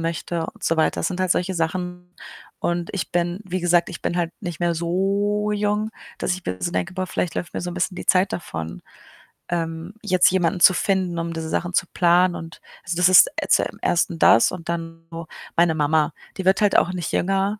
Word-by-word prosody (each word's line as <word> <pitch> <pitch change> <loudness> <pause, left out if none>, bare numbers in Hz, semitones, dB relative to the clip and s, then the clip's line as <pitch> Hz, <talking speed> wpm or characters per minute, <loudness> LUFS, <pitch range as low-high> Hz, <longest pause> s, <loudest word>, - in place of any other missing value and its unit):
möchte 165 0 -3
und - - -11
so 165 - +1
weiter. 160 - +1
Das - - 0
sind 185 0 -4
halt 185 -1 0
solche 185 +2 +1
Sachen 180 +1 -3 0.5
und 175 0 -2
ich 195 - -4
bin, 175 0 0
wie 185 0 -3
gesagt 175 0 +3
ich - - -8
bin 175 - -1
halt 170 -1 -1
nicht 175 -5 -5
mehr 175 -1 +1
so 200 +5 0
jung, 210 +1 0 0.3
dass - - 0
ich 185 - -9
mir 95 - -3
so 175 - -2
denke: 185 - -2
„Boah, 185 0 -2
vielleicht 180 -2 -3
läuft 175 - -4
mir - - -2
so 175 - -4
'n - - -7
bisschen 180 +1 -1
die - - -6
Zeit 185 +1 +3
davon, 80 - -6 0.7
ähm, 165 +1 -3
jetzt 185 -3 +4
jemanden 180 0 +1
zu 185 - +7
finden, 185 -2 0
um 165 0 -3
diese 160 -1 -4
Sachen 175 +2 -2
zu 175 - +2
planen.“ 175 0 +3
Und, 165 0 -9 0.2
also, 170 0 -3
das 180 0 +5
ist 185 - +8
äh, - - -2
zum - - +1
1. 170 -1 0
das 115 - +6
und 175 -2 -8
dann 165 -1 -5
so 165 -1 -7 0.3
meine 170 -1 +3
Mama. 155 +1 +2 0.3
Die 190 - -3
wird 190 +1 +4
halt 205 -1 +3
auch 180 - +3
nicht 175 -3 -4
jünger 195 +3 0
175 Hz, 220 wpm, -22 LUFS, 165-185 Hz, 0.7 s, ist